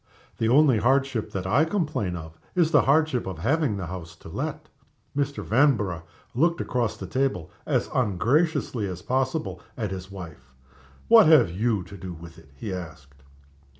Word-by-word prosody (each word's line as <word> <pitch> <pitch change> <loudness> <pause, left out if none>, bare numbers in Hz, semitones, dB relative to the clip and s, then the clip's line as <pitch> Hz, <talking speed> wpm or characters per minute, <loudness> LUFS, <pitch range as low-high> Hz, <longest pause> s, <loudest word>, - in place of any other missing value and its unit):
The 115 - +1
only 135 -3 +5
hardship 130 -1 +1
that 95 -2 -4
I 125 +11 +3
complain 155 - -1
of 80 -1 -8 0.2
is 170 -3 +3
the - - +6
hardship 145 -4 +2
of 95 -3 -5
having 130 - 0
the 95 - -4
house 85 -1 -8
to - - -13
let." - - -4 0.5
Mr. 140 0 -1
Vanborough 110 - +2 0.3
looked 170 +7 +2
across 120 -4 -1
the 95 - -6
table, 130 - -1 0.2
as - - +1
ungraciously 125 - +1
as 90 -1 -7
possible, 130 - -1 0.2
at 105 -5 -3
his 95 0 -6
wife. 80 -9 -11 0.5
"What 225 -5 +8
have 145 - +6
you 105 +1 0
to 100 - -11
do 90 0 -7
with 85 0 -12
it?" 75 -4 -19
he 95 +8 -5
asked. 80 -6 -9
110 Hz, 165 wpm, -25 LUFS, 90-140 Hz, 0.5 s, What